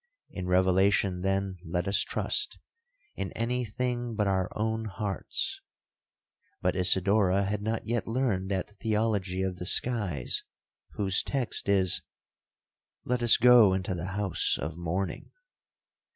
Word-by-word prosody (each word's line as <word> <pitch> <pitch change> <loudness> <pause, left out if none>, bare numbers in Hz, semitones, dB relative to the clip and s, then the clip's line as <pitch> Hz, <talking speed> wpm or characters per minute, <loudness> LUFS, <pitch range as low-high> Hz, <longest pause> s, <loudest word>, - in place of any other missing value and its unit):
In 90 -1 -5
revelation, 95 +1 +2
then, 95 0 -1
let 90 +1 -3
us 100 - +2
trust—in 465 - -4
any 125 +2 -1
thing 120 +1 -3
but 105 -1 +1
our 95 -2 0
own 110 +1 -1
hearts. 100 -1 -3 1.0
But - - 0
Isidora 95 +1 +2
had 100 +1 -2
not 110 +2 -3
yet 120 0 -2
learned 115 -6 -1
that 95 +1 -2
theology 105 -4 0
of 95 -1 -3
the 90 - -6
skies, 100 - +1 0.5
whose 95 -2 +2
text 130 -6 -1
is, 95 -3 +4 1.0
'Let 125 0 -1
us 120 -1 +5
go 120 -5 +7
into 95 0 -2
the 85 0 -4
house 100 -4 +1
of 80 +2 -4
mourning.' 85 +3 -4
100 Hz, 125 wpm, -28 LUFS, 95-115 Hz, 1.0 s, go